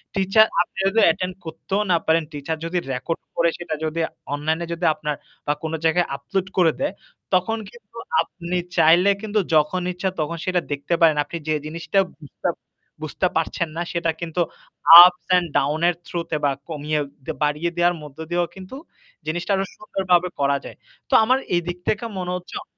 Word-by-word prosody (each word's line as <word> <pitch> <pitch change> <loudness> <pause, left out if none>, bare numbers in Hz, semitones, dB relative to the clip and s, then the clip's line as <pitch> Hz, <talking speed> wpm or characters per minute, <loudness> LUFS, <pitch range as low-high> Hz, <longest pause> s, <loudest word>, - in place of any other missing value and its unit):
Teacher 195 +3 +5 0.2
আপনি 180 - -5
যদি 205 +4 +2
attend 185 +3 +1
করতেও 165 +5 -3
না 170 - +5
পারেন, 160 +1 +3
টিচার 150 +2 -4
যদি 170 +2 -2 0.2
রেকর্ড 150 +6 -3
করে 170 0 +3
সেটা 170 -3 -4
যদি 155 +1 -2 0.3
অনলাইনে 160 +3 -1
যদি 170 +1 -3
আপনার 150 -1 -3 0.3
বা 145 - +3
কোন 160 0 -3
জায়গায় 175 +2 +3
আপলোড 185 +7 -3
করে 170 -3 +5
দেয় 285 +2 -1 0.4
তখন 185 +5 +2
কিন্তু 235 -1 -17 0.2
আপনি 175 0 -4 0.2
চাইলে 170 +4 +6
কিন্তু 215 -1 0 0.2
যখন 155 +4 +2
ইচ্ছা 180 +2 -2
তখন 170 +2 -3
সেটা 180 -1 +1
দেখতে 145 +3 -2
পারেন। 160 -2 +6
আপনি 145 +4 -6
যে 155 - +2
জিনিসটা 165 +5 -1 0.2
বুঝতে 145 - -6 0.6
বুঝতে 155 +4 0
পারছেন 165 +1 -1
না - - -1
সেটা 170 -1 0
কিন্তু 170 +1 -2 0.6
ups 180 0 +3
and 175 -1 0
down 145 +3 +1
এর 175 - +2
থ্রুতে 170 -2 -3
বা 145 - +3 0.2
কমিয়ে 150 -1 -2 0.4
বাড়িয়ে 150 +3 0
দেওয়ার 175 0 +3
মধ্য 150 -1 -12
দিয়েও 175 0 +1
কিন্তু 190 +6 -10 0.5
জিনিসটা 175 +4 -2
আরো 195 0 0
সুন্দরভাবে 180 -4 +1
করা 140 0 +2
যায়। - - -10 0.3
তো - - -3
আমার 255 +4 +3 0.2
এদিক 175 +1 -3
থেকে 215 +3 0
মনে 180 -1 -3
হচ্ছে 180 0 -8
অ - - -11
170 Hz, 175 wpm, -22 LUFS, 155-185 Hz, 0.6 s, চাইলে